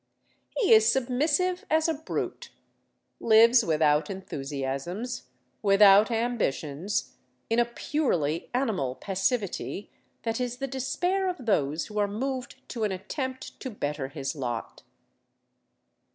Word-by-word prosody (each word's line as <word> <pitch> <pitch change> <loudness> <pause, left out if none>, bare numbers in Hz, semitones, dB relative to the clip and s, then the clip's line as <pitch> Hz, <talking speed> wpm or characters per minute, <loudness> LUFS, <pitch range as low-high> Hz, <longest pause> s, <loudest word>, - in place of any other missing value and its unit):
He 430 - +5
is 220 +1 +6
submissive 295 +8 +1
as 315 +1 +3
a 325 - +1
brute, 315 +1 -4 0.7
lives 230 +2 +6
without 155 -3 +2
enthusiasms, 150 - -4 0.3
without 200 +1 +6
ambitions, 205 - -1 0.3
in 230 - +3
a 240 - +4
purely 205 - -1
animal 215 - -1
passivity 200 - -2 0.3
that 225 +1 -1
is 245 0 -2
the 275 - -2
despair 355 +9 -1
of 355 -9 -6
those 155 -7 +1
who 210 -1 -4
are 205 - +2
moved 255 +4 -4
to 230 -3 -3
an 210 - +1
attempt 260 +8 -5
to 260 - -5
better 145 - -3
his 140 +2 -4
lot. 120 -5 -4
220 Hz, 120 wpm, -27 LUFS, 165-260 Hz, 0.7 s, is